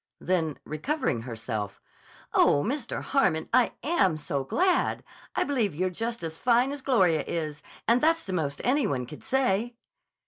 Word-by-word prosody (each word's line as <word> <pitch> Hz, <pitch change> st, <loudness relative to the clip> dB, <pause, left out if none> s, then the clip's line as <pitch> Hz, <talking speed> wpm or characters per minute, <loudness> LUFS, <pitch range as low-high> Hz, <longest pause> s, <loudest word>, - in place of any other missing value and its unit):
Then, 165 Hz, -5 st, 0 dB
recovering 235 Hz, -, -1 dB
herself: 110 Hz, -3 st, -5 dB, 0.5 s
"Oh, 145 Hz, -, +4 dB
Mr. 255 Hz, 0 st, -3 dB
Harmon, 160 Hz, -, +1 dB
I 250 Hz, -1 st, +4 dB
am 195 Hz, -, +2 dB
so 140 Hz, -2 st, -2 dB
glad. 360 Hz, -, +1 dB, 0.3 s
I -, -, +2 dB
believe 235 Hz, -, 0 dB
you're 185 Hz, +3 st, 0 dB
just 230 Hz, +2 st, -3 dB
as 160 Hz, 0 st, -3 dB
fine 250 Hz, +2 st, +3 dB
as 285 Hz, -1 st, -5 dB
Gloria 185 Hz, -, +3 dB
is—and 160 Hz, +9 st, -1 dB
that's 330 Hz, +1 st, +3 dB
the 190 Hz, -, -5 dB
most 145 Hz, -5 st, -2 dB
any 265 Hz, -1 st, +2 dB
one 125 Hz, -8 st, -1 dB
could 150 Hz, +4 st, -11 dB
say." 240 Hz, -3 st, +1 dB
190 Hz, 150 wpm, -27 LUFS, 155-255 Hz, 0.5 s, Oh